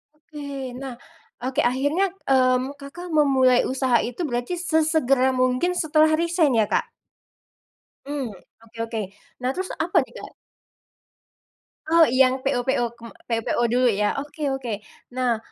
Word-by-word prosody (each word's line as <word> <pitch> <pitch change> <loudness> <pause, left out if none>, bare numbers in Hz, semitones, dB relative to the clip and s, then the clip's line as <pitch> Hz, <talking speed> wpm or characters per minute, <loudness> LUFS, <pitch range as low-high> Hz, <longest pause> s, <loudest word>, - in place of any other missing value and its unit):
Oke 285 -4 -7
nah, 265 -3 -6 0.5
oke 260 +1 -2
akhirnya, 290 +9 +1 0.2
mmm, 255 +1 +3
Kakak, 340 +5 -9
memulai 265 -4 +4
usaha 260 -2 +2
itu 245 +8 -4
berarti 245 +4 -2
sesegera 315 -6 +2
mungkin 255 +8 +1
setelah 315 -2 +3
resign 335 -5 +2
ya, 215 -2 +3
Kak. - - +1 1.2
Hmm, 280 -4 -3 0.3
oke 230 0 -18
oke, 225 -1 -4 0.4
nah 255 - 0
terus 370 +7 -3 0.2
apa 355 - 0
nih, - - -21
Kak. - - -9 1.6
Oh, 335 0 +5
yang 260 +1 +3
PO- 260 -2 0
PO 250 -2 +1
kem 230 -1 -11 0.2
PO- 230 -1 0
PO - - 0
dulu 250 +2 +2 0.2
ya 210 - +1
oke 290 +2 -7 0.2
oke 225 -6 -5 0.3
nah 250 -3 +1
265 Hz, 140 wpm, -23 LUFS, 250-310 Hz, 1.6 s, Oh